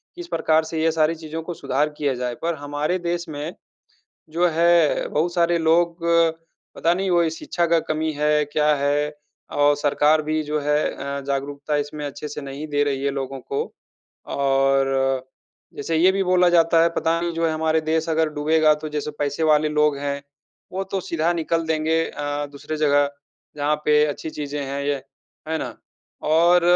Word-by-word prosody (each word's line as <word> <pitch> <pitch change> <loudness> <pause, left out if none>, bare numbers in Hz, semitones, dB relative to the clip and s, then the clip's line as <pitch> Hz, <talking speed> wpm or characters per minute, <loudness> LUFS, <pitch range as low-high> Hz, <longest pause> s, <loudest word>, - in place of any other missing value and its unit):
किस 350 0 -8
प्रकार 160 - +2
से 160 0 -3
ये 165 - +3
सारी 155 0 +2
चीज़ों 160 0 -6
को 175 - -5
सुधार 145 0 0
किया 145 -3 0
जाए। 125 0 -3
पर 170 0 -1
हमारे 145 +4 -2
देश 175 0 -3
में 150 +3 -5 0.8
जो 170 +3 +2
है, 170 -1 +3
बहुत 170 +3 0
सारे 170 -1 +2
लोग, 170 +1 +2 0.8
पता 170 - +2
नहीं, 190 +1 -1
वो 170 -2 +3
शिक्षा 170 +2 -2
का 165 0 +3
कमी 155 0 0
है, 150 0 +2
क्या 150 +1 +2
है, 145 +1 0 0.4
और 145 0 +3
सरकार 150 +1 +3
भी 155 +1 -1
जो 150 0 -2
है 150 +1 +1 0.2
अ, 140 +1 -4
जागरूकता 140 +2 -2
इसमें 145 +1 -4
अच्छे 145 +1 -6
से 150 0 -6
नहीं 140 +2 -6
दे 145 -1 +1
रही 140 -1 -1
है 140 - +1
लोगों 135 -1 -4
को। 140 +2 -3 0.7
और 135 -1 +2 0.5
जैसे 160 +3 -2
ये 185 +3 +5
भी 195 0 0
बोला 180 -1 +4
जाता 165 -1 +4
है, 170 - +3
पता 165 +1 +1
नहीं, 175 - -1
जो 165 0 0
है, 160 - 0
हमारे 160 0 +1
देश 160 +1 -1
अगर 160 0 +2
डूबेगा, 155 +1 +4
तो 155 +1 -7
जैसे 150 0 -3
पैसे 145 +2 -1
वाले 155 -1 +3
लोग 150 -1 +2
हैं, 140 0 -3 0.5
वो 190 +1 -2
तो 195 0 -3
सीधा 165 0 0
निकल 165 0 -1
देंगे 160 +1 +1
अ, 145 0 -3
दूसरे 145 +2 -6
जगह, 145 -1 +3 0.5
जहाँ 145 +1 +1
पे 150 0 +5
अच्छी 150 +1 -4
चीज़े 145 -1 -5
हैं 140 +1 -3
ये। 145 0 0 0.5
है 160 - 0
ना? - - -6 0.5
और 170 +3 +4
155 Hz, 185 wpm, -22 LUFS, 145-165 Hz, 0.8 s, ये